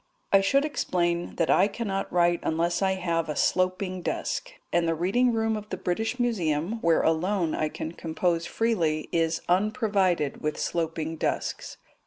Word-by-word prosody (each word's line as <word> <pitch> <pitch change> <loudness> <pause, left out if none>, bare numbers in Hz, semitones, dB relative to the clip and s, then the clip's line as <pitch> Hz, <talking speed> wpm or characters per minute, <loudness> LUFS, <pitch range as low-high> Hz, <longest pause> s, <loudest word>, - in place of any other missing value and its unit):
I 195 - +7
should 275 +9 +3
explain 175 - -1
that 165 - +1
I 195 - +5
cannot 200 -2 -3
write 175 -1 +3
unless 170 +3 0
I 190 -1 +2
have 170 -4 -1
a 150 - -2
sloping 185 +2 0
desk, - - -3 0.2
and 170 -1 +2
the 165 - +1
reading 200 +10 +2
room 225 -1 0
of 210 0 -7
the 185 - -3
British 220 +7 -2
Museum, 190 -4 0
where 165 -1 +3
alone 170 +1 +1
I 155 - 0
can 160 - -5
compose 170 +1 -1
freely, 165 -10 0
is 165 -1 +1
unprovided 195 - +1
with 150 0 -2
sloping 165 -1 -2
desks. - - -3
180 Hz, 160 wpm, -27 LUFS, 165-205 Hz, 0.2 s, I